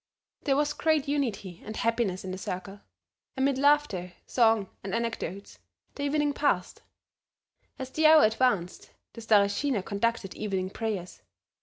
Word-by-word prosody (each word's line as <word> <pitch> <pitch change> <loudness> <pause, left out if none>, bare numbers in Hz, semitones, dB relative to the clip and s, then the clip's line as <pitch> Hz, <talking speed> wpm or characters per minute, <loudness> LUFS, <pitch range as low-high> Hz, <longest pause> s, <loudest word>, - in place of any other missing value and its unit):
There 275 -2 +3
was 295 0 +1
great 310 -2 +1
unity 215 - -2
and 215 0 -7
happiness 230 -5 0
in 185 - -4
the 185 - -4
circle. 195 +2 -6 0.6
Amid 265 0 +1
laughter, 280 -12 +2
song 225 -4 +3 0.2
and 195 +1 -3
anecdotes 225 -5 -4 0.3
the - - -8
evening 290 0 +1
passed; 200 -12 0 1.0
as 260 -1 -6
the 310 +2 +4
hour 310 0 +8
advanced 215 -5 +1 0.2
the 230 - -9
Stareshina 210 +2 +2
conducted 210 -1 -1
evening 190 -3 -3
prayers. 200 -6 -4
225 Hz, 135 wpm, -28 LUFS, 195-280 Hz, 1.0 s, hour